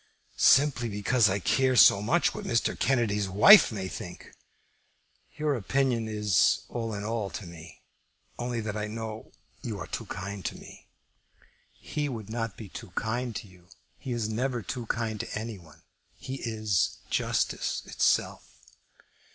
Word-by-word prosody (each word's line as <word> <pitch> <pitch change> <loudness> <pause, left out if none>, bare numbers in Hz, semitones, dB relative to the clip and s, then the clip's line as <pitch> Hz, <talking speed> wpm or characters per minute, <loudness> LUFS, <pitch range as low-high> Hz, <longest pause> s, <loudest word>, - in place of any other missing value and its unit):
"Simply 135 -4 +4
because 105 +2 +2
I 95 - 0
care 130 +6 +2
so 100 -3 +7
much 155 +12 +2
what - - -6
Mr. 115 -1 +1
Kennedy's 105 -6 +1
wife 120 - +8
may 95 -4 -4
think. - - -9 1.1
Your 150 -1 0
opinion 125 -1 0
is 105 -4 +2
all 115 -2 -4
in 100 - -5
all 110 -2 -2
to 100 - -7
me, 85 -1 -12 0.6
only 120 -1 -2
that 105 -1 -4
I 105 0 -2
know 110 0 -7 0.3
you 110 -4 -5
are 90 - -6
too - - -6
kind 100 +1 -6
to - - -4
me." - - -14 0.8
"He 150 -1 -4
would 110 -4 -7
not 115 -2 -3
be 110 - -8
too 95 - -9
kind 120 +1 -2
to 105 - -6
you. 90 -2 -20 0.3
He 130 - -6
is 115 -3 -1
never 120 +1 -2
too 120 +3 -5
kind 110 -2 -2
to - - -4
any 110 -2 -6
one. 80 -2 -18 0.3
He 135 0 -6
is 110 -5 -1
justice - - -1
itself." - - +1
110 Hz, 155 wpm, -28 LUFS, 100-120 Hz, 1.1 s, wife